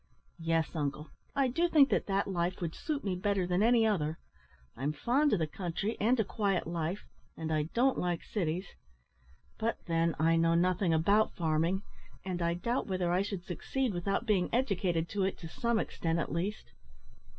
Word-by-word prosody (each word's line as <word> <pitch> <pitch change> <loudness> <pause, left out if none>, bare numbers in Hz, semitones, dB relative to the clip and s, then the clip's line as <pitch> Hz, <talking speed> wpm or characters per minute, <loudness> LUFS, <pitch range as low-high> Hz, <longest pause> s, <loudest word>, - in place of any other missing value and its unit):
"Yes, 165 0 0
uncle. 150 0 -3 0.2
I 275 -1 +3
do 335 +8 +1
think 290 -4 +6
that - - +1
that 195 0 +1
life 175 -1 -1
would 165 -2 -3
suit 295 -2 -3
me 195 -3 -1
better 195 0 0
than 180 +2 +1
any 230 0 +5
other. 165 -7 0 0.6
I'm 140 +5 -2
fond 265 - +2
of - - +3
the 160 - +1
country 180 +6 -3
and 240 +4 +3
a - - +4
quiet 195 -3 0
life, 170 +3 -3 0.3
and 160 -1 -2
I 155 0 0
don't 260 +3 +3
like 175 -2 -1
cities; 180 -2 -2 0.9
but, 225 +1 0
then, 165 0 +1
I 165 +1 +3
know 165 0 +3
nothing 180 +1 +2
about 200 +7 +3
farming, 165 +4 +1 0.4
and 180 -2 -3
I 170 0 +1
doubt 235 +8 -1
whether 185 -3 0
I 180 +2 +3
should 200 -3 -4
succeed 245 +7 -2
without 195 +6 -1
being 195 -6 +2
educated 185 -9 +1
to 200 0 -1
it 190 - -1
to 165 - -8
some 235 +7 0
extent 165 -5 -1
at 165 - -2
least." 175 - -3
180 Hz, 185 wpm, -31 LUFS, 165-215 Hz, 0.9 s, think